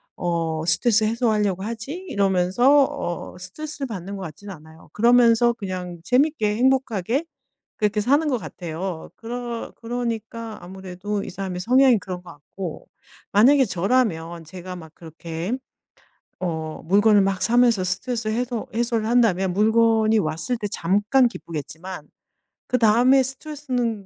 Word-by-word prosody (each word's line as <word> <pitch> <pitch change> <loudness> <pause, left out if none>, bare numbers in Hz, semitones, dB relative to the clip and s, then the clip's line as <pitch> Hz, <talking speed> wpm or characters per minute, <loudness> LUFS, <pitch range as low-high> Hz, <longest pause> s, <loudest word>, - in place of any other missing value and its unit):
어 165 -2 -1
스트레스 215 +6 +3
해소하려고 215 -4 +1
하지?' 225 +5 -5 0.2
이러면서 200 +9 +3
어 180 - -5
스트레스를 280 - -6
받는 200 -3 -6
것 195 - -6
같진 180 +5 -9
않아요. 160 -3 -13
그러면서 235 +1 +5
그냥 185 -5 -6
재밌게 250 - +2
행복하게 260 - +1 0.5
그렇게 210 0 +1
사는 285 +8 +2
거 255 -4 +1
같아요. 175 -3 -6
그러 235 0 -5
그러니까 230 -2 -4
아무래도 190 +2 -5
이 - - -6
사람의 185 -1 -5
성향이 255 +3 +5
그런 185 -3 -7
것 180 - -12
같고 165 +3 -8 0.4
만약에 265 +7 +6
저라면 175 -6 0
제가 180 +2 -8
막 160 -3 -11
그렇게 165 +3 -6 0.9
어 160 -3 -4
물건을 205 +4 +5
막 195 -1 0
사면서 235 -4 +3
스트레스 215 +5 -2
해소 240 +1 -2
해소를 230 -1 0
한다면 215 -6 +2
물건이 220 +2 +3
왔을 165 +6 -1
때 215 - -4
잠깐 205 +10 +2
기쁘겠지만 165 -3 -8 0.6
그다음에 250 +3 +4
스트레스는 255 -6 -3
210 Hz, 320 characters per minute, -23 LUFS, 180-240 Hz, 0.9 s, 만약에